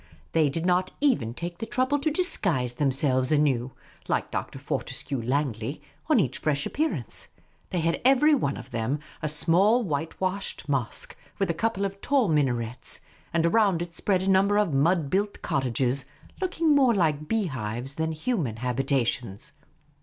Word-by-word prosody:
They 155 -3 +3
did 165 +4 -3
not 180 +1 +2
even 140 - +1
take 175 +2 -6
the 225 - -4
trouble 260 +3 +1
to 305 +3 +1
disguise 190 - +1
themselves 130 -1 +2
anew, 135 -4 +2 0.3
like - - -1
Dr. - - -4
Fortescue 135 -4 -3
Langley, 125 0 -1 0.3
on 300 -6 +5
each 135 - 0
fresh 145 -2 0
appearance. 315 +2 -2 0.4
They 180 -3 -1
had 165 +1 0
every 275 +4 +5
one 145 - 0
of - - -10
them 115 +4 -1 0.2
a 155 - -1
small 185 +10 +3
whitewashed 185 +4 -3
mosque, 135 -5 -2 0.2
with 195 -4 +1
a - - -2
couple 200 +3 -1
of 195 0 -5
tall 275 -6 +2
minarets; 125 -6 -1 0.3
and 165 0 +1
around 190 -2 +3
it 170 -1 -10
spread 185 +1 0
a - - -3
tunn 190 0 +4
ber 205 0 +2
of 205 -7 +2
mud 155 +1 +2
bnilt 205 +2 -1
cottages, 130 0 0 0.4
looking 335 -4 +2
more 260 -5 +4
like 155 -5 +1
bee 225 +1 +1
hives 125 -2 -3
than 160 +2 -1
human 155 - -1
habitations. 125 -3 -1
160 Hz, 160 wpm, -26 LUFS, 135-200 Hz, 0.4 s, on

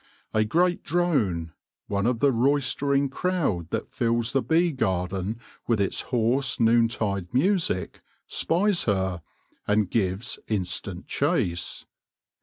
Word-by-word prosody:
A 110 - +3
great 175 +10 +1
drone 125 - 0 0.2
— - - -64
one 100 +1 0
of 120 -2 0
the 140 - +5
roistering 140 +2 +1
crowd 135 - -1
that - - -3
fills 115 0 0
the 135 - +3
bee 170 +4 +2
garden 95 - -2 0.3
with 115 -3 +2
its 100 - 0
hoarse 125 +2 +1
noontide 115 -5 +2
music 155 - 0 0.2
— - - -46
spies 185 +2 +1
her, 95 -4 0 0.5
and 105 -2 +2
gives 100 +1 -1
instant 95 -5 -3
chase. 85 0 -1
115 Hz, 125 wpm, -26 LUFS, 95-140 Hz, 0.5 s, the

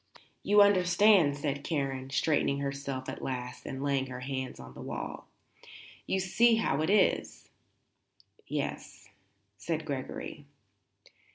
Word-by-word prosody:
"You 205 0 +6
understand," 185 -5 +4
said 145 -1 -3
Karen, 135 -5 -2
straightening 145 0 +1
herself 140 -1 -4
at - - -6
last 125 -1 -5
and 135 0 -5
laying 140 -2 0
her 125 -1 -7
hands 130 0 -4
on 65 0 -10
the - - -10
wall. - - -6 0.8
"You 190 - +1
see 230 +5 +4
how 155 -10 0
it 160 - 0
is." 210 +1 +1 1.0
"Yes," - - -5 0.5
said 160 -2 -3
Gregory. 140 0 -6
140 Hz, 120 wpm, -30 LUFS, 135-180 Hz, 1.0 s, You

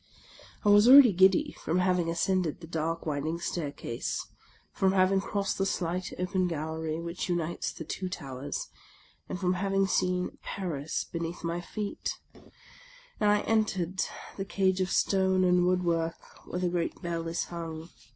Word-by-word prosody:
I - - +5
was 205 +2 +7
already 265 -5 +10
giddy 190 +1 +4
from 165 - 0
having 180 -2 +2
ascended 175 -1 0
the 170 - -9
dark 165 0 -2
wind 145 -1 -2
ing 165 +2 -2
staircase, 145 -8 -3 0.5
from 190 0 +2
having 190 0 +3
crossed 200 0 -2
the 195 - +2
slight 180 0 -2
open 185 0 0
gallery 160 0 -3
which 170 +2 -4
unites 175 -1 -1
the - - -8
two 185 +4 -4
towers, 140 -5 -5 0.6
and 180 - -4
from 180 -1 +1
having 195 +1 +1
seen 180 -1 0
Paris 160 -6 -3
be 170 - -6
neath 170 +1 -5
my 170 +1 -2
feet; 205 +3 -4 0.2
and - - -6
I 210 0 +4
entered 190 -5 0 0.4
the 195 - -2
cage 190 -1 +1
of 185 - 0
stone 190 0 +2
and 180 -1 +4
woodwork 170 -2 -1
where 180 - -3
the 180 - +1
great 175 -1 -2
bell 170 -1 -2
is 165 +1 -1
hung. 165 -1 -6
180 Hz, 160 wpm, -29 LUFS, 165-190 Hz, 0.6 s, already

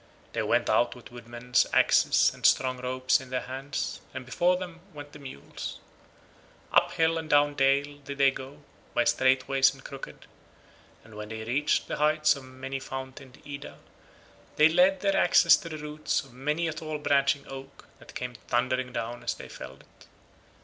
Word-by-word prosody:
They - - -1
went - - +1
out 120 - +2
with 120 -1 -14
woodmen's 120 +1 -1
axes - - +4
and - - -16
strong 130 -1 +3
ropes 130 +2 +1
in 130 - -12
their 130 0 -2
hands, 135 +3 -5
and 130 0 -6
before 175 +8 +2
them 175 -2 -7 0.2
went 145 0 -9
the 150 - -12
mules. 130 - -8 0.9
Up - - +4
hill 165 0 +2
and 160 -1 -7
down 145 -1 +4
dale 140 +1 +1
did 140 0 -8
they 135 -1 +5
go, 135 +1 -10 0.3
by - - +4
straight 130 0 +2
ways 135 0 +4
and 135 0 -15
crooked, 135 -1 -9 0.8
and 110 - -16
when 105 0 -8
they 110 0 -6
reached 135 +7 0
the - - -3
heights 155 0 +3
of 140 -2 -10
many 130 +1 -6
fountained 130 0 -9
Ida, 140 -1 -8 0.8
they 155 +1 +6
laid 180 +3 +4
their 195 -1 +1
axes 175 - +6
to 165 - -8
the 155 - -6
roots 150 0 -2
of 135 -3 -17
many 150 +6 -1
a 160 - -2
tall 155 -1 -5
branching 140 -1 +1
oak 135 0 -10
that - - -15
came 125 -1 -4
thundering 125 +1 0
down 120 0 -4
as - - -1
they - - -10
felled 65 +1 -10
it. - - -22
135 Hz, 180 wpm, -28 LUFS, 130-150 Hz, 0.9 s, they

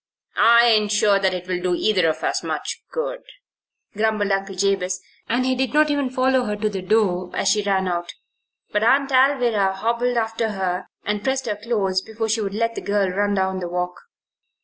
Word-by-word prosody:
"I 235 +1 +6
ain't 215 -3 +3
sure 205 -1 +3
that 190 -1 +2
it'll 180 0 -3
do 180 -1 0
either 185 -4 +2
of 155 - -4
us - - 0
much - - -4
good," - - -3 0.7
grumbled 215 -1 0
Uncle 195 0 -1
Jabez, 190 -1 0 0.3
and 245 +2 +1
he 260 - +2
did 260 +2 -2
not 305 0 +4
even 285 -3 0
follow 255 0 +1
her 210 - -2
to 215 +1 -1
the 195 -2 -4
door 185 -2 +1
as 195 - +1
she 210 +1 +2
ran 195 -2 0
out. 175 -1 -3 0.6
But 210 - 0
Aunt 275 +4 +3
Alvirah 245 -7 +3
hobbled 235 +4 0
after 225 -1 -1
her, 185 -1 -2 0.2
and 210 0 -2
pressed 265 +1 -1
her 210 -3 -2
close 205 -4 -1
before 220 +2 -4
she 220 +1 +1
would 200 -1 -3
let 230 +1 0
the - - -6
girl 200 -2 0
run 205 +2 0
down 190 -1 0
the 180 - -4
walk. 180 0 -3
210 Hz, 195 wpm, -22 LUFS, 190-235 Hz, 0.7 s, I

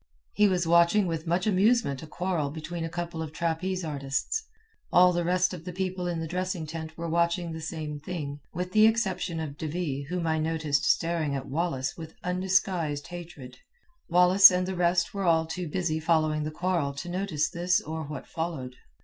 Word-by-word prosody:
He 210 - +4
was 180 -3 +1
watching 170 +4 +4
with 165 -1 -3
much 175 +3 +1
amusement 210 - +2
a 160 - -9
quarrel 175 -4 -2
between 165 +3 -5
a 165 - -3
couple 170 -1 -4
of 160 -2 -5
trapeze 170 +3 -2
artists. 145 - -2 0.5
All 180 0 +6
the 175 0 0
rest 180 +2 +2
of 175 -3 -7
the 180 - -6
people 185 0 -3
in 170 -2 -2
the 165 - -3
dressing 180 0 -2
tent 160 0 -7
were 170 0 -4
watching 170 +1 +1
the 160 0 -6
same 155 -2 -5
thing, 145 -3 -5
with 180 +1 -4
the 215 +2 +6
exception 190 -7 0
of 150 -3 -6
De 160 - -3
Ville 150 -4 -3
whom 180 -1 -2
I 160 -1 +1
noticed 155 -2 0
staring 165 -4 +1
at 135 -1 -4
Wallace 135 -3 -1
with 160 -1 -9
undisguised 180 -5 0
hatred. 155 -8 -9 0.5
Wallace 180 +3 +8
and 180 0 0
the 190 - -2
rest 175 0 +1
were 200 -1 -2
all 165 -1 +3
too 175 +2 -4
busy 160 -1 -1
following 155 -2 +1
the - - -2
quarrel 165 -3 -1
to 155 +5 -6
notice 175 -4 -1
this 175 0 +2
or 160 +1 -5
what 145 -2 -7
followed. 150 -7 -5
170 Hz, 190 wpm, -27 LUFS, 155-180 Hz, 0.5 s, Wallace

